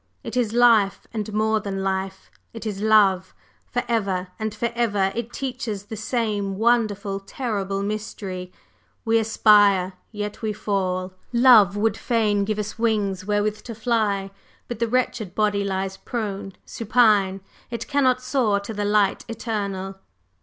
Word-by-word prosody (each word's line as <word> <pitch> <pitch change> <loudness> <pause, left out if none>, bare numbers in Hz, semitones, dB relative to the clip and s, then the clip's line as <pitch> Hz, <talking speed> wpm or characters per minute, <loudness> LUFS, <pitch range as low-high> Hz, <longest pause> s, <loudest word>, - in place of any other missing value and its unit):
It - - -6
is 240 -4 +1
life, 230 -4 +4
and 215 -1 -3
more 215 +1 +1
than 195 -2 -4
life; 190 0 -3 0.2
it 225 -1 -8
is 205 -2 -4
love. 205 -4 +3 0.4
Forever 215 -7 -1
and 220 0 -2
forever 215 -3 0
it 235 0 -4
teaches 235 -7 -4
the 220 +2 -8
same 210 -3 -2
wonderful, 210 -3 +1
terrible 195 -2 -3
mystery. 200 -3 -5 0.5
We 225 0 +3
aspire, 205 -4 +4 0.2
yet 210 -1 -5
we 215 -2 -1
fall; 185 -3 -2 0.2
love 235 -5 +6
would 220 0 +1
fain 210 -4 +1
give 215 0 -2
us 210 +1 -5
wings 205 -5 0
wherewith 210 0 0
to 230 - -8
fly; 210 -4 0 0.4
but 240 -3 -6
the 235 - +1
wretched 225 -5 -1
body 205 -2 +1
lies 190 0 -2
prone 200 -4 -4
supine; 210 -4 +2 0.3
it 235 -1 -5
cannot 260 -3 +2
soar 245 -6 +1
to 210 +2 -6
the 205 0 -2
Light 205 -1 +2
Eternal." 200 -4 -4
210 Hz, 140 wpm, -23 LUFS, 195-230 Hz, 0.5 s, love